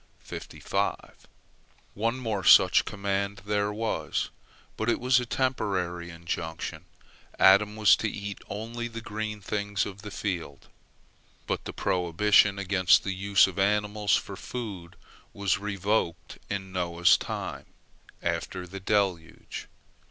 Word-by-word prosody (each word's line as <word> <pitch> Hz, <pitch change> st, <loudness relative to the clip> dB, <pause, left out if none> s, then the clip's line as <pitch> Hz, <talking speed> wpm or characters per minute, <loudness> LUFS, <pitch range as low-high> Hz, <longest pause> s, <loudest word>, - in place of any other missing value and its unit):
One 115 Hz, +4 st, -1 dB
more 110 Hz, -6 st, -2 dB
such 90 Hz, +1 st, +7 dB
command 100 Hz, -1 st, -2 dB
there 105 Hz, 0 st, 0 dB
was, 110 Hz, +2 st, -2 dB, 0.4 s
but 110 Hz, +1 st, -1 dB
it -, -, +2 dB
was 125 Hz, 0 st, +4 dB
a 125 Hz, -, -4 dB
temporary 95 Hz, -10 st, -1 dB
injunction. 85 Hz, -1 st, -5 dB, 0.5 s
Adam 100 Hz, +2 st, +6 dB
was 110 Hz, -2 st, +6 dB
to 110 Hz, -, -1 dB
eat 100 Hz, -1 st, -6 dB
only 115 Hz, +4 st, -4 dB
the 115 Hz, 0 st, -7 dB
green 110 Hz, -1 st, -5 dB
things 105 Hz, 0 st, -1 dB
of 100 Hz, -1 st, -8 dB
the 105 Hz, -, -7 dB
field. 85 Hz, -8 st, -4 dB, 0.8 s
But -, -, -3 dB
the -, -, -4 dB
prohibition 100 Hz, +3 st, +3 dB
against 95 Hz, -2 st, +4 dB
the 100 Hz, -, -2 dB
use 100 Hz, +1 st, +4 dB
of -, -, -5 dB
animals 105 Hz, +1 st, +2 dB
for -, -, -3 dB
food 100 Hz, -9 st, -7 dB, 0.4 s
was 100 Hz, -1 st, 0 dB
revoked 100 Hz, -4 st, -2 dB
in 95 Hz, -2 st, -4 dB
Noah's 85 Hz, -1 st, +3 dB
time, -, -, -5 dB, 0.6 s
after 90 Hz, -1 st, -2 dB
the 95 Hz, +2 st, -8 dB
deluge. 95 Hz, -4 st, -1 dB
100 Hz, 120 wpm, -28 LUFS, 95-105 Hz, 0.8 s, such